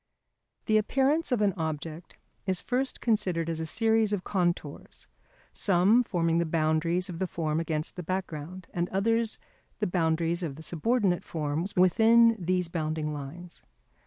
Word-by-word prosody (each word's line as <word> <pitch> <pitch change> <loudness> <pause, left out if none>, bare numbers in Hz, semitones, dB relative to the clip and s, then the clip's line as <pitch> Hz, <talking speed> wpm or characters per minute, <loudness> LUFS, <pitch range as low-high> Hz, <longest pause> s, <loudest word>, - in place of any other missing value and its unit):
The 215 - +3
appearance 275 +8 +1
of 230 -4 +2
an 200 -2 +2
object 160 0 -5 0.3
is 185 -1 +1
first 260 +1 -2
considered 185 -8 0
as 160 - -4
a 160 - -3
series 220 +2 +2
of 200 -3 -1
contours, 175 -6 -3 0.5
some 195 +5 +4
forming 170 -7 0
the 170 - +1
boundaries 160 +3 +1
of 175 -3 -7
the 190 - 0
form 160 -3 -2
against 160 -2 -2
the - - -3
background, 180 0 -5
and 175 0 -1
others 225 +3 0 0.4
the 210 - -1
boundaries 170 -1 0
of 155 -6 -4
the 160 - -9
subordinate 185 +2 0
forms 160 +4 -3
within 225 +5 +5
these 180 0 +1
bounding 155 -2 -2
lines. 155 +5 -9
175 Hz, 150 wpm, -28 LUFS, 160-210 Hz, 0.5 s, within